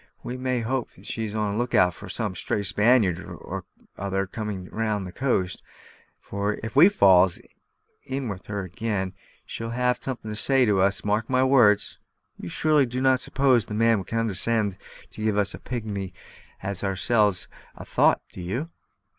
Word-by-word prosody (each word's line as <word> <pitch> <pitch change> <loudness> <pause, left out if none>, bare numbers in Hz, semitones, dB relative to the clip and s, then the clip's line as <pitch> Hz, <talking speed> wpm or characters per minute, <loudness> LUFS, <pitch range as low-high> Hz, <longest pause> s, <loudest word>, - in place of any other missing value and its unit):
We 125 - -5
must 130 -2 -1
hope 130 0 -1
she's 110 -2 -4
on 105 -1 0
the 100 - -3
look 120 0 -1
out 90 -1 +4
for - - -11
some - - -3
stray 105 - -2
Spaniard 105 -1 +3
or - - -7 0.3
other 95 0 -1
coming 100 -1 -5
down 105 0 -2
the 90 - -7
coast; 95 -7 -1 0.6
for 100 +1 -2
if 110 - -6
we 165 +8 +8
falls 95 - +5 0.6
in 135 -1 -4
with 95 -3 -7
her 100 -1 -3
ag'in, 95 0 -3 0.3
she'll 115 0 -6
have 125 +1 0
some'at 130 -2 -5
to 110 -1 -5
say 130 +5 +5
to 100 -4 +2
us, 100 +2 +1
mark 105 +2 0
my 130 0 +3
words." 120 -6 +4 0.4
"You 85 - -6
surely 150 - +2
do 125 +2 -4
not 130 0 +3
suppose 130 -7 +2
the 105 - -5
man 115 0 +3
will 95 - -7
condescend 110 -2 0 0.4
to 110 - -7
give 110 -1 +1
such 100 -1 +1
a - - -8
pigmy 100 -6 -5 0.5
as 100 0 -3
ourselves 100 0 +1 0.3
a - - -10
thought, - - +3
do - - -9
you?" 120 - -4
110 Hz, 175 wpm, -25 LUFS, 100-125 Hz, 0.6 s, we